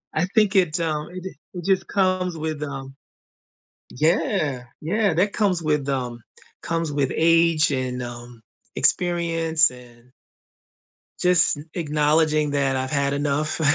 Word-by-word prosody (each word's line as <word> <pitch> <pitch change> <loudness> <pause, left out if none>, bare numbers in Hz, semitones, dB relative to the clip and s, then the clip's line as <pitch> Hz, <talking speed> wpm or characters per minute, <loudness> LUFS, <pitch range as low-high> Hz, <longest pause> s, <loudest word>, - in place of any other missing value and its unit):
I 160 - +2
think 210 -2 +3
it's, 175 -4 +2
um, 155 -2 -2
it 180 0 -8
d 190 - -5 0.2
it 180 -1 -6
just 190 -1 +1
comes 185 -3 0
with, 155 -1 -4
um 135 -2 -7 0.9
Yeah, 155 -2 0 0.2
yeah, 200 +4 +1
that 200 +4 +1
comes 195 -5 +1
with, 150 -3 0
um 125 -3 -3 0.4
comes 165 -2 -2
with 140 -2 0
age 165 -1 +3
and, 130 -2 -2
um, 120 -1 -9 0.3
experience 165 -3 +2
and 125 -1 -16 1.1
just 180 -3 +3
n 145 - -9
acknowledging 150 -1 +1
that 140 -2 +1
I've 130 0 -2
had 140 -1 0
enough, 145 +2 -1
155 Hz, 135 wpm, -23 LUFS, 140-175 Hz, 1.1 s, think